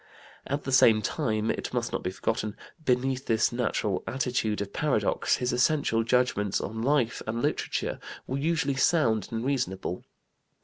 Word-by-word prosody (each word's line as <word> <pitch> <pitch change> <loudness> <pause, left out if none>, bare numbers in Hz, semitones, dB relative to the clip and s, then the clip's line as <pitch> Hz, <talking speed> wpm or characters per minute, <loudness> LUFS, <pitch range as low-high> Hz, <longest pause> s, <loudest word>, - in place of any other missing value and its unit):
At 140 +1 -2
the 135 - -4
same 115 -4 +6
time, 110 0 0
it - - -4
must - - -1
not - - -2
be - - -2
forgotten, 105 +2 -2 0.3
beneath 130 0 0
this 110 -1 +2
natural 115 -5 -1
attitude 120 -4 -1
of 100 -1 -4
paradox, 130 -9 +1
his 125 0 -1
essential 125 -3 +2
judgments 115 -4 +1
on 110 +2 -4
life 130 -2 +1
and 115 +2 -2
literature - - -1 0.3
were 135 +2 -3
usually 150 -2 +1
sound 120 - +2
and 115 +1 -3
reasonable. 95 -10 -2
120 Hz, 150 wpm, -28 LUFS, 110-135 Hz, 0.3 s, same